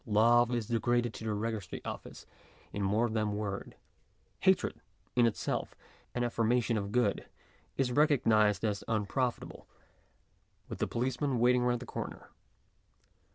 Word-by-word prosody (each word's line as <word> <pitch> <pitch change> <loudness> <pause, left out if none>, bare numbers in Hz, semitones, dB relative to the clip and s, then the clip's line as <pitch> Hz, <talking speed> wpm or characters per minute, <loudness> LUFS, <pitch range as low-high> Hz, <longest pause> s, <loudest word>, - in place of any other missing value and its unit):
Love 120 +3 +5
is 120 -3 -1
degraded 120 +1 +1
to - - -8
the 110 - -1
registry 105 -1 -3
office - - -7 0.5
in 100 - -3
more 105 +5 +2
than 110 -2 -1
word; 100 -2 -4 0.6
hatred, - - +2 0.3
in 120 -1 +5
itself, 115 - -2 0.4
an 120 - 0
affirmation 120 0 +1
of 100 -2 -2
good, 120 -3 +1 0.5
is 130 -2 +1
recognized 115 - +3
as 105 -1 -1
unprofit 115 +3 0
able, - - -11 1.0
with - - -7
the - - 0
policeman 130 +2 -1
waiting 125 +1 +4
round 120 0 +1
the 125 - -8
corner. - - -7
115 Hz, 135 wpm, -31 LUFS, 105-120 Hz, 1.0 s, Love